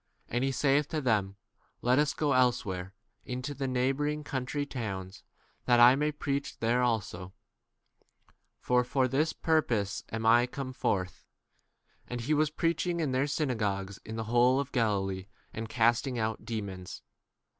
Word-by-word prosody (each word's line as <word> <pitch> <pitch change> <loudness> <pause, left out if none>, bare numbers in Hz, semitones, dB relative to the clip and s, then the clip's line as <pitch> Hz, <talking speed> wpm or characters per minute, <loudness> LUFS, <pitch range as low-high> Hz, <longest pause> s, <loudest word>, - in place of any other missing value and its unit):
38 - - -5
And 120 - +1
he 135 - +1
saith 140 +2 +2
to 155 - -2
them, 105 -7 +1 0.5
Let 125 +3 +4
us 150 -1 +1
go 150 -2 +1
elsewhere 100 -7 +1 0.3
m 125 - -4
into 125 +3 -4
the 135 -1 -3
neighbouring 135 +4 0
country 140 +1 -3
towns, 100 -8 -5 0.4
that 120 -1 +4
I 120 +2 +8
may 150 +2 0
preach 140 -1 -3
there 120 +2 +1
also, 100 -6 -2 1.3
for 125 0 +2
for 130 +1 +1
this 145 +5 +1
purpose 115 -11 0
am 110 0 -3
39 115 +2 +6
I 125 - 0
come 130 0 -6
forth. 90 -6 -2 0.8
And 125 -1 -4
he 140 +7 0
was 155 0 +3
preach 165 +2 0
ing 170 -1 -1
in 155 -5 0
their 130 +2 +1
synagogues 105 -10 -2
in 110 - -7
the 115 - -3
whole 120 +4 +3
of 140 0 -3
Galilee, 100 -6 0 0.3
and 110 0 -5
casting 120 +3 +2
out 110 -1 -2
demons. 100 -5 -6
125 Hz, 165 wpm, -30 LUFS, 110-140 Hz, 1.3 s, I